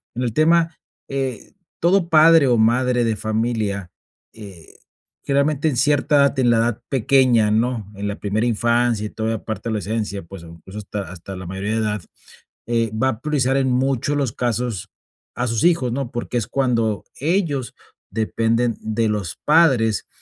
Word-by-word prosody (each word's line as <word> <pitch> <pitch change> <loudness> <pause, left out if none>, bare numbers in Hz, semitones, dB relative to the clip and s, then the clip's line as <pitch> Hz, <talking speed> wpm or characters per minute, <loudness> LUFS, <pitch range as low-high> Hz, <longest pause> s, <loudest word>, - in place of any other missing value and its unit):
En 120 - -3
el 120 -3 -2
tema, 165 +3 +3 0.3
eh, 135 -3 -4 0.3
todo 175 +1 +3
padre 160 -1 +6
o 125 - +4
madre 125 +2 +2
de 115 -1 0
familia, 110 -4 -2 0.4
eh, 100 -7 -12 0.5
generalmente, 140 +2 +1
en 140 - -2
cierta 145 +2 +2
edad, 140 0 +4
t 135 - 0
en 120 - +3
la 115 - +3
edad 115 0 0
pequeña, 130 -4 +3
¿no? 110 -2 -1
En 100 +1 -4
la 100 - -4
primera 105 +3 -1
infancia 120 -1 +1
y - - -9
toda 110 +1 -3
la 115 - -4
parte 110 +1 -5
de - - -1
la 105 - -1
esencia, 105 -1 -3
pues, 85 +1 -11
incluso, 85 +4 -12
hasta 105 0 -5
hasta 90 +2 -9
la 95 0 -8
mayoría 95 +3 -4
de - - 0
edad, 105 -2 -1 0.7
eh, 115 -2 0
va 125 +4 +1
a 110 -4 -4
priorizar 135 -4 +1
en 135 -1 +1
mucho, 135 +3 0
los 135 -6 -1
casos 120 -4 -2 0.5
a 120 +1 -1
sus 115 -1 -1
hijos, 165 -8 +2
¿no? 135 -2 -3
Porque 120 +1 -5
es 115 - -2
cuando 115 -6 0
ellos 150 - -1 0.4
dependen 115 +2 0
de 110 +1 -1
los 105 -5 -3
padres, 130 - +3
120 Hz, 180 wpm, -21 LUFS, 110-135 Hz, 0.7 s, padre